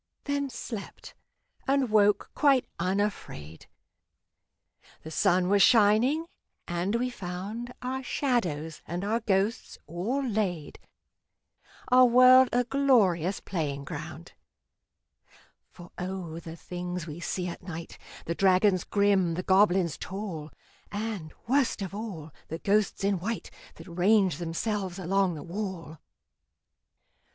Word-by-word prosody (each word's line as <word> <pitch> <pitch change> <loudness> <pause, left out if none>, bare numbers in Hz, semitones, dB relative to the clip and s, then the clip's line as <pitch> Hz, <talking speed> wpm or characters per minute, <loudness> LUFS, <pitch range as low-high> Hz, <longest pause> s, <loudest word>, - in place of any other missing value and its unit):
Then 285 -1 -1
slept, 230 -4 -8 0.5
and 270 -3 +2
woke 210 -1 +3
quite 275 -4 +3
unafraid. 185 - -3 1.4
The 160 - -8
sun 180 +1 +2
was 200 +1 +3
shining, 245 +7 +4 0.4
and 175 +5 -1
we 250 +2 0
found 200 +5 -6
Our 260 +1 -2
shadows 175 - -1
and 175 +3 -4
our 225 +3 +1
ghosts 205 0 -1
all 200 - -2
laid, 195 - -2 1.1
Our 255 0 +7
world 255 +1 +7
a 245 +1 +2
glorious 220 - +2
playing 145 -7 -3
ground. - - -8 1.4
For 175 0 -14
O! 180 -3 -5
the 165 -1 -9
things 180 0 -5
we 155 0 -8
see 180 +1 -3
at 170 - -7
night 170 -2 -8 0.3
The 170 - -1
dragons 185 +1 +3
grim, 200 -4 +2
the 180 - -3
goblins 190 -4 +3
tall, 185 -6 -6 0.4
And, 205 -6 -4
worst 260 -4 +1
of 190 - -6
all, 195 -8 -6 0.2
the 160 - -5
ghosts 205 +2 +1
in 200 -2 +1
white 215 +5 -4 0.2
That 165 - -12
range 185 -1 +2
themselves 185 +2 -3
along 190 -1 +1
the 150 - -7
wall! 175 -4 -6
195 Hz, 120 wpm, -28 LUFS, 175-225 Hz, 1.4 s, Our